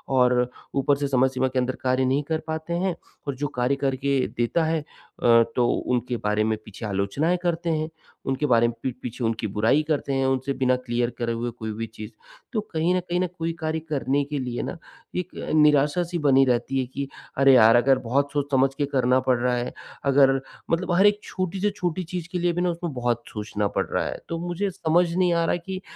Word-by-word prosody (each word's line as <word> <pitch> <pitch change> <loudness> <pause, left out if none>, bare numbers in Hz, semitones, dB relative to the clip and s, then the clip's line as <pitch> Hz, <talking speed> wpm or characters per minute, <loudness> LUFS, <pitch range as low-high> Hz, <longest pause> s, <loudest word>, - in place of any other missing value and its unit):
और 125 -1 +3 0.3
ऊपर 140 +1 +3
से 140 0 -1
समय 130 -1 +3
सीमा 130 0 0
के 130 0 -1
अंदर 130 +1 -1
कार्य 130 0 +2
नहीं 135 +3 +1
कर 160 -1 +1
पाते 160 +2 -3
हैं 180 0 0 0.3
और 140 - -2
जो 145 +3 -2
कार्य 125 +3 +2
करके 135 0 0 0.2
देता 120 +8 +1
है 160 0 +1
अ, 120 -5 +2
तो 120 -1 +3
उनके 125 -1 -1
बारे 105 0 0
में 110 0 0
पीछे 105 +2 -8
आलोचनाएँ 105 - 0
करते 170 -1 0
हैं। 155 -1 0 0.4
उनके 135 +2 0
बारे 120 -3 +4
में 120 - -2
पीठ 130 -2 -2
पीछे 125 0 -5
उनकी 115 -1 -1
बुराई 110 +9 +2
करते 145 -3 0
हैं 135 0 +1
उनसे 135 +1 0
बिना 130 -1 +2
क्लियर 120 0 0
करे 115 -1 -1
हुए 120 +1 -2
कोई 110 -2 -6
भी 115 +2 -4
चीज़। 110 0 -9 0.4
तो 220 - +1
कहीं 165 +3 +2
न - - +2
कहीं 175 0 -2
ना, 185 - +1
कोई 165 -1 -4
कार्य 160 0 -1
करने 140 -1 +1
के 145 0 -3
लिए 125 -2 -3
ना - - -5 0.4
एक 180 0 -4 0.2
निराशा-सी 150 +4 +3
बनी 135 -3 +5
रहती 130 +2 0
है 130 - 0
कि 135 +2 -5 0.3
अरे! 135 0 +6
यार, 115 -2 +7
अगर 130 +2 +4
बहुत 140 +4 0
सोच-समझ 135 -2 +2
के 145 - 0
करना 130 -2 +2
पड़ 130 -1 +2
रहा 125 0 +1
है, 120 0 -3 0.3
अगर 135 -1 +5 0.3
मतलब 180 +2 0
हर 190 +3 +5
एक 205 0 +2
छोटी 185 0 -3
से 210 - +3
छोटी 180 -2 -2
चीज़ 175 -1 -5
के 180 - -1
लिए 175 0 +1
भी 175 - -1
ना 180 - +2
उसमें 170 -3 -3
बहुत 120 -2 -1
सोचना 105 -1 -2
पड़ - - +2
रहा - - -1
है। - - -4
तो 165 - -2
मुझे 185 +3 -1
समझ 175 -1 +2
नहीं 180 -2 +3
आ 170 0 +2
रहा - - +1
है 175 - -1
कि 190 -1 -5
135 Hz, 225 wpm, -24 LUFS, 125-165 Hz, 0.4 s, यार